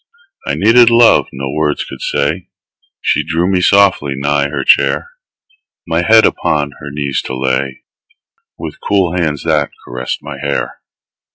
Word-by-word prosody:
I -, -, -1 dB
needed 120 Hz, +1 st, +5 dB
love 115 Hz, 0 st, +5 dB
no 65 Hz, 0 st, -5 dB
words 75 Hz, -1 st, -1 dB
could -, -, -10 dB
say; 80 Hz, +6 st, -2 dB, 0.5 s
She -, -, +1 dB
drew 85 Hz, +2 st, -1 dB
me 95 Hz, -1 st, +1 dB
softly 95 Hz, -8 st, +3 dB
nigh 70 Hz, +1 st, 0 dB
her 75 Hz, -, -3 dB
chair, 475 Hz, -, +2 dB, 0.7 s
My 85 Hz, 0 st, 0 dB
head 110 Hz, +5 st, +5 dB
upon 75 Hz, -1 st, 0 dB
her 70 Hz, 0 st, -10 dB
knees 70 Hz, -2 st, -2 dB
to 65 Hz, -, -5 dB
lay, 65 Hz, 0 st, -2 dB, 0.7 s
With -, -, -8 dB
cool 95 Hz, -4 st, 0 dB
hands 80 Hz, -5 st, -1 dB
that 75 Hz, -3 st, +1 dB, 0.2 s
caressed 60 Hz, +1 st, -5 dB
my -, -, -8 dB
hair. -, -, -3 dB
75 Hz, 150 wpm, -14 LUFS, 70-90 Hz, 0.7 s, needed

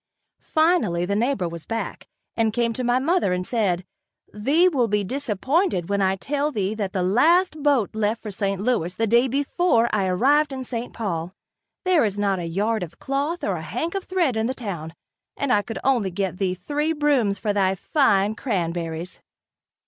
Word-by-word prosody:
Finally 315 Hz, -, +3 dB
the 200 Hz, +2 st, -1 dB
neighbor 225 Hz, -4 st, 0 dB
was 170 Hz, -1 st, -8 dB
back, 225 Hz, 0 st, -4 dB, 0.3 s
and 225 Hz, -2 st, +1 dB
came 235 Hz, 0 st, +1 dB
to 255 Hz, -, -4 dB
my 245 Hz, +1 st, +2 dB
mother 285 Hz, -, +1 dB
and 180 Hz, 0 st, -2 dB
said: 185 Hz, -7 st, 0 dB, 0.5 s
"Thee 285 Hz, +12 st, +3 dB
will 265 Hz, -9 st, +2 dB
be 210 Hz, -1 st, +1 dB
disappointed 260 Hz, -, 0 dB
when 200 Hz, 0 st, +1 dB
I 190 Hz, 0 st, +2 dB
tell 285 Hz, -, -1 dB
thee 200 Hz, -5 st, -1 dB
that 205 Hz, -3 st, -3 dB
the 185 Hz, -2 st, -1 dB
last 310 Hz, -, +3 dB
boat 275 Hz, -9 st, +2 dB
left 220 Hz, +1 st, -1 dB
for 215 Hz, -, -5 dB
St. 195 Hz, -1 st, -2 dB
Louis 195 Hz, -6 st, 0 dB
the 225 Hz, -, +1 dB
day 235 Hz, +4 st, +4 dB
before 275 Hz, -2 st, +1 dB
I 200 Hz, -3 st, +1 dB
arrived 280 Hz, +11 st, +3 dB
in 260 Hz, -1 st, -4 dB
St. 240 Hz, -1 st, -5 dB
Paul. 180 Hz, -5 st, -4 dB, 0.5 s
There 365 Hz, -6 st, +4 dB
is 205 Hz, -2 st, -1 dB
not 200 Hz, -2 st, +1 dB
a 175 Hz, -, -4 dB
yard 210 Hz, +7 st, -1 dB
of 170 Hz, -1 st, -7 dB
cloth 285 Hz, +6 st, -2 dB
or 190 Hz, -3 st, 0 dB
a -, -, -6 dB
hank 245 Hz, -, -3 dB
of 390 Hz, -1 st, -3 dB
thread 345 Hz, -9 st, +1 dB
in 220 Hz, +1 st, 0 dB
the 260 Hz, -, -2 dB
town, 170 Hz, -9 st, -6 dB, 0.4 s
and 280 Hz, -3 st, +1 dB
I 205 Hz, -, +4 dB
could 225 Hz, +2 st, -6 dB
only 245 Hz, -8 st, +2 dB
get 185 Hz, 0 st, -3 dB
thee 185 Hz, -2 st, 0 dB
three 295 Hz, -, -1 dB
brooms 280 Hz, -10 st, +2 dB
for 210 Hz, -2 st, -1 dB
thy 195 Hz, -1 st, +2 dB
fine 205 Hz, -, +2 dB
cranberries." 170 Hz, -6 st, -3 dB
220 Hz, 190 wpm, -23 LUFS, 190-275 Hz, 0.5 s, day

